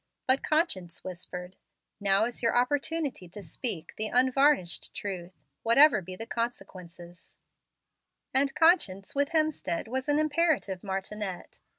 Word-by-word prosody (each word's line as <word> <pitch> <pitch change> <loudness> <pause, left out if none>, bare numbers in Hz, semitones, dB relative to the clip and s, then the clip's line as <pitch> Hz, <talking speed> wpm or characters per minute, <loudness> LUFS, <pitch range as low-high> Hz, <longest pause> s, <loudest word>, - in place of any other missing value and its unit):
But 260 +1 +2
conscience 190 - -1
whispered, 180 0 -7 0.4
"Now 200 +1 +3
is 240 0 -3
your 230 0 +2
opportunity 285 - -1
to 205 +3 -10
speak 175 - -3
the 215 - -1
'unvarnished 260 - +2
truth,' 185 -3 -6 0.2
whatever 235 0 +6
be 185 +1 -8
the 225 - -7
consequences"; 180 -8 -6 1.0
and 275 +1 +2
conscience 205 - +3
with 285 +1 +1
Hemstead 310 - -1
was 260 +4 -3
an 290 - +3
imperative 310 - +1
martinet. 195 -1 -5
225 Hz, 120 wpm, -28 LUFS, 185-280 Hz, 1.0 s, whatever